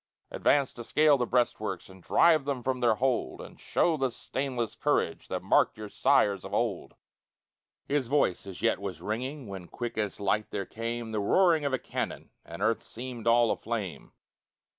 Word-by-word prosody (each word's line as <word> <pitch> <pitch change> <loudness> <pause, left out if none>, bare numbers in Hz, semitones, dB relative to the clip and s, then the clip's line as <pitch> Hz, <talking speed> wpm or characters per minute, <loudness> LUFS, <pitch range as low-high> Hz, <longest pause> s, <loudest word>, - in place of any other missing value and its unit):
Advance 140 -2 +2
to 120 - -8
scale 150 +5 +4
the 125 -3 -1
breastworks, 110 -6 0
And 95 -1 -15
drive 160 - +4
them 135 -4 -2
from 130 0 -1
their 120 -3 +3
hold, 130 +1 0
And - - -11
show 165 -2 +1
the 135 -2 +1
stainless 125 -2 -3
courage - - 0
That - - -4
marked - - +3
your 105 -1 -7
sires 100 -1 +2
of 100 +1 -4
old!" 110 -6 -2 0.9
His 140 -3 0
voice 130 -9 +1
as 95 +2 -8
yet 115 - +2
was 100 -2 -5
ringing, 130 +5 -4
When, 95 -3 -7
quick 120 +2 -5
as 105 -1 -2
light, 100 +1 0
there 100 - -3
came 115 +1 -4
The 110 - -1
roaring 160 - +3
of 140 - 0
a - - +3
cannon, - - -5
And - - -7
earth - - +2
seemed 120 -1 -7
all 115 -1 +5
aflame. 105 -10 -4
120 Hz, 180 wpm, -29 LUFS, 105-130 Hz, 0.9 s, all